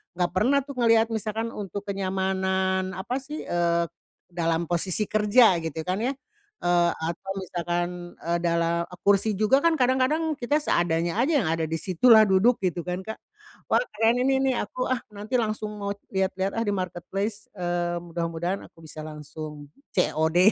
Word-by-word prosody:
enggak 175 -1 0
pernah 250 +9 +3
tuh 280 -1 -8
ngelihat 230 -1 +5
misalkan 220 +1 -2
untuk 200 -1 -5
kenyamanan 190 -1 0
apa 190 +7 -3
sih, 295 +3 -7
eee, 170 -1 +1 0.5
dalam 165 -1 0
posisi 175 +4 -1
kerja 210 -3 +5
gitu 160 -1 -4
kan 185 +4 -1
ya, 250 +4 0 0.5
eee, 175 -1 +3 0.2
atau 180 +3 -8
misalkan, 175 -1 -3
eee, 170 +1 -2
dalam 170 0 +1 0.2
kursi 200 +1 +3
juga 215 +7 +4
kan 335 +1 +3
kadang-kadang 275 +4 +1
kita 250 +4 0
seadanya 170 - +1
aja 265 +7 +2
yang 160 - -1
ada 165 -1 0
di 160 - -2
situ 180 +7 0
lah 220 -2 +9
duduk 205 +5 +4
gitu 180 -1 0
kan 180 +1 -3
Kak. 220 +3 -7 0.5
Wah, - - +5
keren 230 +2 +3
ini 270 0 +3
nih 265 -1 +2
aku, 255 - -3
ah, 255 -1 0
nanti 210 +5 -5
langsung 215 -1 -2
mau 200 0 -2 0.2
lihat-lihat, 190 0 0
ah, - - +1
di 205 - 0
marketplace, 195 +3 -4
eee, 175 -1 -1
mudah-mudahan 170 +2 -3
aku - - -22
bisa 155 0 -9
langsung 150 -1 -8 0.3
COD 160 -1 +2
190 Hz, 165 wpm, -26 LUFS, 170-220 Hz, 0.5 s, lah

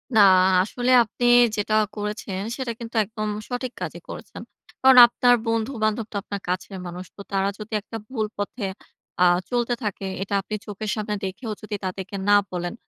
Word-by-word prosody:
না, - - +6 0.3
আ - - +4
আসলে 245 +5 -1
আপনি 235 +2 -4 0.3
যেটা 210 +1 -1 0.2
করেছেন, 210 -2 -4
সেটা 255 -3 -3
কিন্তু 230 0 -8
একদম 215 +1 -5 0.2
সঠিক 250 0 -3
কাজই - - -5
করেছেন। - - -9 0.4
কারণ 265 -1 +7
আপনার 245 +1 +4
বন্ধু-বান্ধব 225 -1 0
তো - - -10
আপনার 200 -1 -6
কাছের 185 +2 -3
মানুষ। 175 +1 -7
তো 200 - -10
তারা 195 0 +1
যদি 215 +1 -8
একটা 225 +2 -7
ভুল 225 -5 -1
পথে 205 +2 -4 0.6
আ - - +7 0.3
চলতে 240 -1 0
থাকে, 200 -1 -3 0.2
এটা 200 +1 -4
আপনি 215 +2 -5
চোখের 210 0 -5
সামনে 210 -1 -2
দেখেও 215 +5 -5
যদি 215 0 -5
তাদেরকে 190 +1 -5
না 205 - +7 0.2
বলেন, 175 +1 -3
215 Hz, 170 wpm, -24 LUFS, 200-235 Hz, 0.6 s, কারণ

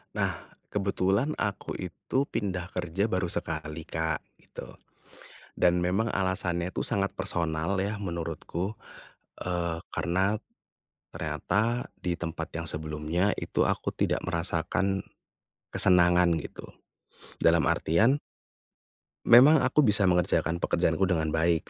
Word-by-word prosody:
Nah - - -1 0.3
kebetulan 100 +6 +1
aku 100 -2 -3
itu 130 +9 -2
pindah 90 -4 -3
kerja 90 +4 -1
baru 90 -3 -1
sekali, 80 0 -4
Kak, 80 -1 -1 0.2
gitu, - - -11 0.8
dan 90 0 +3
memang 95 +6 +1
alasannya 90 -2 -1
itu - - -3
sangat 100 -3 0
personal 85 -2 -1
ya 105 +2 -2
menurutku, 85 +1 -4 0.7
eee, 85 -2 -2
karena, 95 +5 +1 0.8
ternyata 115 +4 -1
di 90 - -1
tempat 80 -1 -5
yang 85 0 -4
sebelumnya 75 +5 -1
itu - - 0
aku - - -1
tidak - - 0
merasakan, 90 +3 -1 0.8
kesenangan 90 -2 +5
gitu, - - -9 0.7
dalam 85 0 +5
artian 115 - +3 1.1
memang 135 +6 +8
aku 130 +2 +3
bisa 100 -3 +4
mengerjakan 85 -1 +1
pekerjaanku 85 +1 +1
dengan 80 -4 0
baik 80 +1 +1
90 Hz, 110 wpm, -28 LUFS, 85-100 Hz, 1.1 s, memang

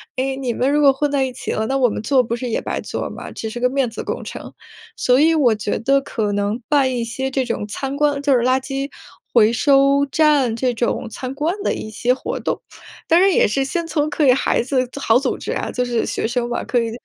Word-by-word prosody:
诶， 265 +1 -1
你 255 -3 -2
们 255 +4 +1
如 295 - +2
果 280 -2 +7
混 290 +1 -1
在 275 -2 +1
一 260 - -5
起 - - -5
了， 220 0 -1
那 270 - 0
我 255 -2 +3
们 210 - -4
做 255 +2 +3
不 230 - -4
是 245 0 -4
也 - - 0
白 - - -3
做 - - -4
吗？ - - -8
只 220 - -5
是 240 - -6
个 250 +1 +2
面 265 -2 0
子 225 - -6
工 - - -4
程。 - - -8 0.4
所 250 +1 +3
以 325 +1 +4
我 255 -7 +4
觉 210 0 -2
得 275 +3 +3
可 220 -6 -2
能 205 +4 -1
办 280 -3 +3
一 240 - -1
些 255 +3 -3
这 265 0 0
种 230 -3 -3
参 270 +6 -4
观 290 -1 +1
就 285 -1 +2
是 250 - +4
垃 255 +2 +2
圾 270 +1 -4 0.4
回 225 -1 +5
收 275 +2 +3
站 295 -7 +3
这 250 +1 0
种 235 +1 -1
参 255 +3 -6
观 315 +6 -1
的 - - +1
一 215 - -7
些 240 +3 +1
活 - - -4
动， - - -2 0.5
当 335 - +5
然 390 +1 +5
也 - - +4
是 270 +6 0
先 335 +5 -2
从 305 -2 0
可 300 0 +1
以 255 - +7
孩 255 - +1
子 255 0 0
组 280 - -9
好 230 -2 +3
组 275 - -2
织 - - -5
啊， - - -3
就 250 -1 -1
是 240 -2 0
学 - - -2
生 240 0 -2
嘛， 240 - -2
可 245 - 0
以 230 - -2
260 Hz, 280 characters per minute, -20 LUFS, 235-280 Hz, 0.5 s, 果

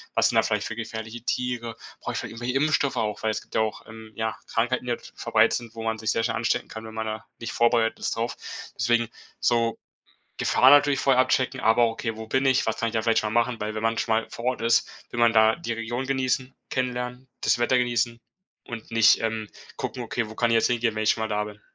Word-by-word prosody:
was - - +4
sind - - +1
da - - +7
vielleicht - - 0
für 110 - -5
gefährliche 110 0 -6
Tiere? 120 -2 -2 0.2
Brauch - - -4
ich - - -3
vielleicht - - -5
irgendwelche 125 +2 -2
Impfstoffe 145 -1 +2
auch?“ 105 -1 -2
Weil 110 - +1
es - - -3
gibt - - -14
ja - - +3
auch, 110 0 -2
ähm, 110 -1 -11
ja 110 -1 -2
Krankheiten, 120 +2 0
die 125 - -2
halt 120 - -5
verbreitet - - +3
sind, 115 -1 -10
wo 115 - -6
man 110 0 -1
sich 110 0 -1
sehr 115 - 0
schnell 115 - 0
anstecken 115 0 0
kann, 110 0 -8
wenn 110 - -9
man 110 0 -3
da 110 0 -5
nicht 115 - -5
vorbereitet 115 -1 +2
ist - - -2
drauf. 115 +1 -2 0.4
Deswegen 120 +1 +2 0.3
so, 115 -1 +2 0.6
Gefahr 130 - +4
natürlich 145 -1 +5
vorher 130 -2 +4
abchecken. 130 0 0
Aber 115 +2 +4
okay: 115 -1 -4
„Wo 110 0 -7
bin 130 +4 +1
ich? 130 -1 +3
Was 110 - -1
kann 115 - 0
ich - - -11
da 110 - +1
vielleicht 115 0 +3
schon 105 - -2
mal 120 - +4
machen?“ 120 -2 -6
Weil 105 +1 -2
wenn 110 - -3
man 115 0 +1
schon 115 - +1
mal 115 - -1
vor 115 - -8
Ort 125 -2 0
ist, 115 0 +3 0.2
will 120 - -4
man 120 -1 +6
da 110 0 +5
die 170 -8 -5
Region 115 +3 -3
genießen, 130 -1 -1 0.2
kennenlernen, 125 0 -3
das - - +2
Wetter 120 +2 +3
genießen 120 -1 0 0.5
und 115 -2 -8
nicht, 115 -2 +5
ähm, 110 -1 -2 0.3
gucken: 125 - -4
„Okay, 115 -1 -2
wo 110 - -10
kann 120 0 +2
ich - - +4
jetzt 115 - +4
hingehen, 120 -2 0
wenn 110 - -1
ich 105 - +5
schon 110 - -3
mal 110 - 0
da 105 0 0
bin.“ 105 0 -11
115 Hz, 255 wpm, -25 LUFS, 110-125 Hz, 0.6 s, da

